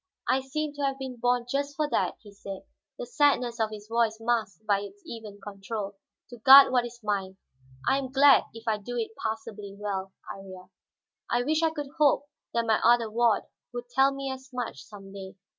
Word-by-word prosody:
"I 265 - +2
seem 295 +3 -3
to 290 - -7
have 275 -1 0
been 260 -2 -6
born 245 0 +1
just 280 +2 -2
for 305 0 0
that," - - +1
he 210 - -14
said, 200 -1 -8 0.3
the - - -5
sadness 280 - +2
of 220 -1 +1
his 210 -1 -9
voice 230 -1 +1
masked 225 -4 -1
by 200 -2 +2
its 385 - -10
even 220 -7 -9
control, 200 0 -6 0.4
"to 240 - -9
guard 270 +4 +9
what 245 -2 +2
is 240 0 -14
mine. 195 -2 -2 0.5
I 270 - +3
am 260 -2 -5
glad 280 0 +6
if 225 0 -12
I 215 -1 +1
do 245 +4 -6
it 225 -2 -2
passably 220 -2 -5
well, 195 -2 -3 0.2
Iría. 190 -2 -12 0.6
I 240 +1 +1
wish 310 +4 +1
I 325 - +3
could 295 -3 -6
hope 285 -1 +4 0.3
that 235 0 0
my 220 -1 +2
other 235 -1 +4
ward 230 -1 +2 0.3
would 245 0 -6
tell 270 +2 +4
me 275 0 -4
as 265 0 -9
much, 245 - -5
some 195 -2 -12
day. 190 -1 -9
235 Hz, 200 wpm, -27 LUFS, 210-270 Hz, 0.6 s, guard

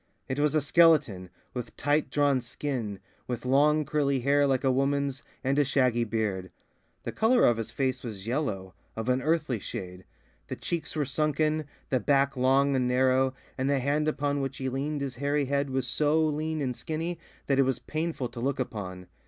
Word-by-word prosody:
It 130 +2 -3
was 150 +1 +2
a 155 - +3
skeleton, 145 - +4 0.2
with 125 -2 -6
tight 145 +2 +1
drawn 145 -3 +2
skin, 120 -5 -4 0.3
with 125 -1 -4
long 150 +4 +3
curly 140 -3 +1
hair 140 +2 +3
like 135 -1 +1
a 135 - +3
woman's, 140 +1 0 0.2
and 135 +2 +1
a - - +5
shaggy 125 -4 +2
beard. 105 -4 -2 0.5
The - - -3
colour 240 +3 +3
of 120 - +4
his 115 -1 -4
face 130 +2 -1
was 105 -5 -7
yellow, 110 -8 -2 0.2
of 110 +2 -3
an 125 +1 +2
earthy 150 -5 0
shade; 90 -1 -7 0.4
the - - -4
cheeks 170 -2 -3
were 150 -2 0
sunken, 155 +2 0 0.3
the 130 - +3
back 140 +4 +2
long 135 +2 +3
and 125 -1 +1
narrow, 130 +1 +2 0.2
and 130 +1 +1
the 140 - +3
hand 145 +3 0
upon 145 -1 0
which 135 - -3
he 130 -1 -2
leaned 140 +3 -2
his 135 -3 -4
hairy 145 +1 0
head 140 +1 0
was 130 -1 -1
so 150 +5 +2
lean 155 0 -1
and 125 -2 -2
skinny 165 +4 -4 0.3
that 140 -1 +1
it - - +7
was 130 -2 0
painful 155 -4 -3
to 120 0 -9
look 135 +2 -1
upon. 95 -7 -5
135 Hz, 190 wpm, -28 LUFS, 125-145 Hz, 0.5 s, it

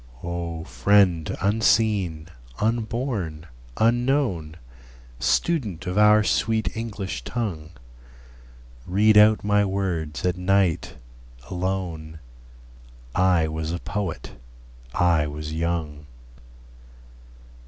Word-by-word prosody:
O 85 -1 -4
friend 85 +5 +2
unseen, 100 -6 +1 0.3
unborn, 110 - -2 0.3
unknown, 115 - +1 0.6
Student 110 - 0
of 90 -1 -3
our 105 +1 +6
sweet 110 +1 0
English 105 -4 -5
tongue, 95 -11 -4 1.2
Read 105 +4 +4
out 105 +1 +6
my 105 0 +3
words 95 -5 -2
at 90 0 0
night, 95 -2 +1 0.6
alone: 90 -4 -3 1.0
I 90 -3 +3
was 80 0 -4
a 85 - -2
poet, 90 -8 -4 0.6
I 85 -4 +3
was 75 +1 -6
young. 80 -3 -3
95 Hz, 85 wpm, -24 LUFS, 80-105 Hz, 1.2 s, our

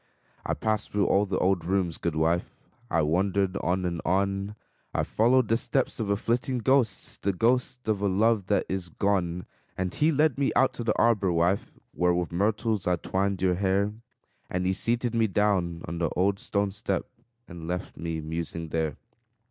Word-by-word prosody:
I - - -1
passed 110 -1 -1
through 105 -2 +2
all 100 +3 +3
the 95 -1 -1
old 90 -2 +2
rooms, 90 -1 0
good 85 -2 -2
wife; 80 +2 0 0.3
I 80 - +2
wandered 95 +4 +1
on 90 +2 0
and 85 -2 -2
on; 100 +3 0 0.4
I - - +2
followed 120 +2 +3
the 115 - +3
steps 130 +1 -1
of 110 -3 -2
a 100 - +3
flitting 120 +4 -1
ghost, 125 -3 +1
The 100 - +1
ghost 125 +5 0
of 105 -2 0
a 100 - +2
love 105 +1 +2
that 100 - +2
is 95 -2 -3
gone. 90 -2 0 0.3
And 90 -1 -2
he 155 +2 +3
led 150 -2 +2
me 140 - +2
out 135 - +4
to 120 - -5
the 110 -2 0
arbor, 105 -5 +3
wife, 85 +3 +1 0.2
Where 90 0 +2
with 90 -1 -2
myrtles 105 +2 0
I 90 - +3
twined 95 +2 -1
your 90 -1 +3
hair; 100 +2 +1 0.6
And 90 0 -1
he 95 - +2
seated 120 +4 -1
me 115 -1 +3
down 95 -5 0
on 85 +1 -4
the 85 -2 +1
old 100 +2 +1
stone 100 -1 -1
step, 105 +2 -2 0.4
And 85 -3 -9
left 90 +2 -4
me 80 -1 -4
musing 80 +1 -4
there. 80 -1 -1
95 Hz, 190 wpm, -27 LUFS, 90-110 Hz, 0.6 s, out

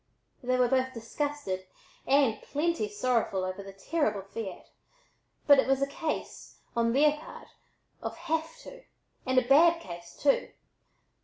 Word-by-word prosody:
They 255 0 +1
were 250 -1 +4
both 260 +1 +1
disgusted 230 -5 -3 0.4
and 270 -6 +3
"plenty 295 -6 -1
sorrowful" 215 -3 0
over 185 +1 -4
the 195 0 -9
terrible 210 0 -1
fiat, 195 -1 -7 0.8
but 285 -2 +7
it 265 - +2
was 270 0 +3
a 275 - +2
case, 305 +3 -5 0.2
on 230 0 +2
their 300 +2 +4
part, 315 - -11 0.5
of - - -5
"have 325 +5 -2
to," - - -11 0.5
and 260 0 +1
a 255 -1 +4
bad 330 +5 +6
case, 170 - -10
too. 280 -1 +2
260 Hz, 145 wpm, -29 LUFS, 210-295 Hz, 0.8 s, but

